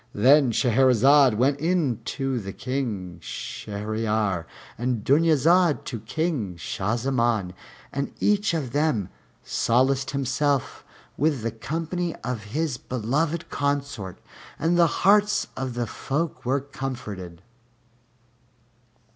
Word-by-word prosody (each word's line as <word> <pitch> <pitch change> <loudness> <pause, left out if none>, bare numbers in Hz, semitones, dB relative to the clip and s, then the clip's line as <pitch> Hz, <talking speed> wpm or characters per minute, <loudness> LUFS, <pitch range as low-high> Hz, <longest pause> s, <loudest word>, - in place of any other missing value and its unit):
Then 135 +4 +5
Shahrazad 130 +2 +5
went 135 +5 +2
in 160 -7 +1
to 135 -3 -2
King 105 -10 -4
Shahryar 105 -1 -3 0.3
and 120 -2 -2
Dunyazad 165 +3 +4
to 120 - -4
King 115 - -2
Shah 95 +8 -2
Zaman, 120 -6 0 0.4
and 140 0 -2
each 205 -3 +2
of 140 -7 -3
them 145 - +1 0.3
solaced 130 +3 +1
himself 140 0 -1 0.3
with 145 -5 +1
the 115 - -1
company 165 +8 -3
of 120 -4 -4
his 145 +4 -2
beloved 145 +9 -2
consort, 140 -9 -2 0.4
and 165 +2 +1
the 170 -1 +5 0.2
hearts 210 +1 +4
of 130 -2 -4
the 120 0 -1
folk 150 +8 -3
were 135 +2 +2
comforted. 105 -11 -6
130 Hz, 105 wpm, -25 LUFS, 110-150 Hz, 0.4 s, Then